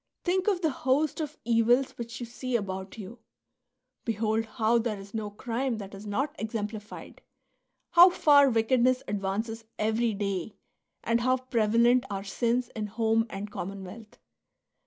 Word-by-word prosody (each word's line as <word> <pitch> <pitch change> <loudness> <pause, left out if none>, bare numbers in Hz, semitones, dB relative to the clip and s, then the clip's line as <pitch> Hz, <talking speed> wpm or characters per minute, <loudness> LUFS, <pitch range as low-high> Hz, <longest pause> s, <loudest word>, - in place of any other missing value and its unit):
Think 370 +2 0
of 385 -4 +2
the 320 -3 +2
host 275 +4 0
of 300 -1 -5
evils 240 +3 +3
which 235 -1 -7
you 240 - -4
see 245 +1 -4
about 190 -2 -3
you; 220 +3 -9 0.8
behold 225 0 0
how 225 +1 +1
there 225 -2 -2
is 195 +1 -12
no 215 -2 -3
crime 235 +3 -2
that 200 -2 -8
is 200 +2 -9
not 270 +8 -1
exemplified, 215 -1 -6 0.7
how 350 +2 +9
far 285 -5 +5
wickedness 250 +2 +2
advances 210 +3 -3
every 220 +1 +1
day, 200 -1 -3 0.5
and 235 0 +1
how 255 +1 +3
prevalent 240 0 +2
are 195 -1 -4
sins 235 +4 0
in 215 -1 -3
home 225 +1 +1
and 205 +1 -6
commonwealth. 195 +4 -8
230 Hz, 145 wpm, -28 LUFS, 210-255 Hz, 0.8 s, how